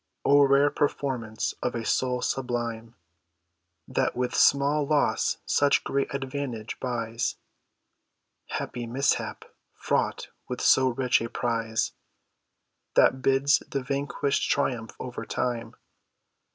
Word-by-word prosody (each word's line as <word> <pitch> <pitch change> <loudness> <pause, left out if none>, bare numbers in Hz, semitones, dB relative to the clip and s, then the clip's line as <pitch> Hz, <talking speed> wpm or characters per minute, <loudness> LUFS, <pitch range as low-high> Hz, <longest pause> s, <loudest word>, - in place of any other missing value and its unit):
O 145 +1 +6
rare 140 +1 +5
performance 125 -6 -1
of 125 - -1
a 115 -1 -3
soul 125 -1 0
sublime, 120 -3 -3 0.9
That - - 0
with 125 0 -1
small 140 +2 +4
loss 150 -1 +1
such 145 -1 +3
great 140 0 -1
advantage 135 -4 -4
buys! 115 -2 -2 1.1
Happy 120 -1 -4
mishap! 135 +4 -1 0.3
fraught - - -1 0.2
with - - -4
so 130 0 +5
rich 125 -1 +1
a 115 - -3
prize, 115 -2 -1 1.0
That 130 - +4
bids 135 +2 +3
the 135 -2 -2
vanquished 140 +1 -1
triumph 120 -5 -1
over 125 -1 -6
time. 115 -2 -3
125 Hz, 110 wpm, -27 LUFS, 115-140 Hz, 1.1 s, O